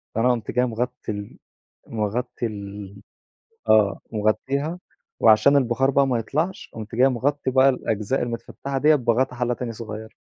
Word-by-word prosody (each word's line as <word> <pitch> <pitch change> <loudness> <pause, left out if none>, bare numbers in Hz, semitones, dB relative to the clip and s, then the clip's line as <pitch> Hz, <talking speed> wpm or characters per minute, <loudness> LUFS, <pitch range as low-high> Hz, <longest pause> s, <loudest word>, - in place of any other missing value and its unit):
فأنا 125 +3 +3
قُمت 115 -3 -2
جاي 125 0 +2
مغطي 125 0 -3
ال 105 -1 -7 0.5
مغطي 115 +3 -3
ال 100 -2 -7 0.7
آه، 105 -2 +4
مغطّيها، 135 +10 -1 0.4
وعشان 110 +6 +6
البخار 130 0 +2
بقى 140 0 +3
ما 125 -3 +1
يطلعش 155 - -3
قُمت 110 +1 -7
جاي 130 +2 +5
مغطّي 135 +2 -1
بقى 130 +1 +5
الأجزاء 115 -1 -1
المتفتحة 120 +3 -4
دِيّة 150 +3 +5
بغطا 125 0 +1
حلّة 120 0 0
تاني 120 0 -4
صغيّرة. 110 -1 -8
120 Hz, 145 wpm, -23 LUFS, 110-135 Hz, 0.7 s, وعشان